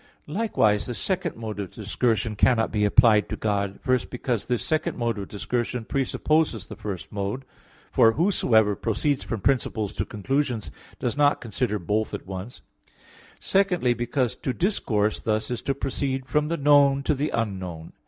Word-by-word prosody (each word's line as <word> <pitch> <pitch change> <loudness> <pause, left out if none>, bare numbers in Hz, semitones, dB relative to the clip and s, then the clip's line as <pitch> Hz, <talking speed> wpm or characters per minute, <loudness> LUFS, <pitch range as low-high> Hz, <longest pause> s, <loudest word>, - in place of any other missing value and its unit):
Likewise 150 - +1
the 120 - -4
second 185 - -2
mode 110 -2 -6
of 100 -3 -4
discursion 115 0 -1
cannot 115 +1 +3
be 105 -1 +1
applied 110 0 +5
to - - -2
God. 100 -2 -1
First, 130 -2 +1
because 125 -3 -2
this 125 -2 -1
second 155 0 -1
mode 115 -3 -1
of 100 - -5
discursion 120 +2 -3
presupposes 135 - 0
the - - -9
first 100 -5 -6
mode; 105 +6 -3 0.5
for 115 0 +5
whosoever 110 - +3
proceeds 130 +7 0
from 115 -4 -4
principles 110 -5 0
to - - -1
conclusions 125 +2 -2 0.3
does 120 - -2
not 145 0 +3
consider 115 -1 -1
both 105 +4 -1
at - - -8
once; 95 +5 -7 0.8
secondly, 180 -10 +2
because 120 +1 -1
to 130 - -2
discourse 110 - 0
thus 110 +1 -1
is 120 - -2
to 135 - -1
proceed 135 -1 -2
from 150 +3 +1
the 170 +2 -1
known 140 -1 +5
to 150 - +2
the 145 +2 -1
unknown. 95 -7 -4
120 Hz, 165 wpm, -25 LUFS, 105-140 Hz, 0.8 s, applied